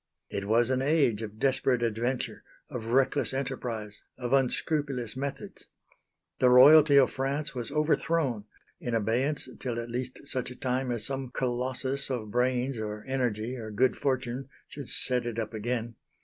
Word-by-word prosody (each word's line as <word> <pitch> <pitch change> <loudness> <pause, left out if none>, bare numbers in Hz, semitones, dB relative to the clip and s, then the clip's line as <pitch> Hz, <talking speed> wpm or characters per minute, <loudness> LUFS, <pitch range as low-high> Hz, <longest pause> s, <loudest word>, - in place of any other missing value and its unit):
It 100 0 -3
was 115 +3 +3
an 130 0 +1
age 135 -7 +2
of 110 -1 -7
desperate 130 -1 +1
adventure, 120 +3 -2 0.3
of 115 -2 -5
reckless 130 +2 +2
enterprise, 120 -6 -4 0.2
of 125 0 -3
unscrupulous 135 -2 0
methods. 140 +1 -6 0.7
The 125 - +5
Royalty 145 +3 +8
of 135 - +5
France 140 +3 -2
was 120 -2 -2
overthrown 150 -5 +1 0.3
in 120 -1 -2
abeyance 125 +7 0
till 120 -2 -3
at 115 0 -6
least 125 +1 -4
such 130 -4 -2
a 125 - -9
time 130 +1 -1
as 120 -3 -2
some 135 -2 -3
Colossus 130 +2 -1
of 115 -5 -3
brains 125 +1 0
or 105 0 -5
energy, 125 -3 -1
or 110 -3 -6
good 120 +4 +2
fortune, 130 -1 -2 0.2
should 140 -3 -8
set 125 -2 +1
it 115 -2 -4
up 110 -1 -3
again. 115 +1 -3
125 Hz, 155 wpm, -29 LUFS, 115-135 Hz, 0.7 s, Royalty